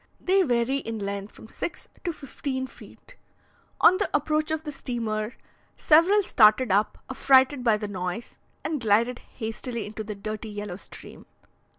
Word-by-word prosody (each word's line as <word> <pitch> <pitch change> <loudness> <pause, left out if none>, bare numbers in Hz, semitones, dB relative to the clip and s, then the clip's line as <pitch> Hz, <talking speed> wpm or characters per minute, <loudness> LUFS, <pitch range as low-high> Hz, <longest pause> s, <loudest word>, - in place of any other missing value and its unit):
They 385 +1 +3
vary 250 -3 +1
in 225 -5 -4
length 200 0 -5
from - - -12
six 340 - -6 0.2
to 345 - -1
fifteen 275 -3 -4
feet. - - -15 0.6
On 370 - +7
the 410 - 0
approach 305 +1 +1
of 315 0 -2
the 300 - -5
steamer, 230 -5 -3 0.4
several 355 +7 +5
started 220 - +5
up, 205 +2 +2
affrighted 265 0 +4
by 225 -3 +4
the 210 0 -4
noise, 185 +2 -5 0.2
and 305 -4 -2
glided 230 +3 +2
hastily 230 0 -5
into 215 +1 -6
the 210 0 -6
dirty 215 +2 -5
yellow 205 -3 -6
stream. - - -13
235 Hz, 155 wpm, -26 LUFS, 215-285 Hz, 0.6 s, On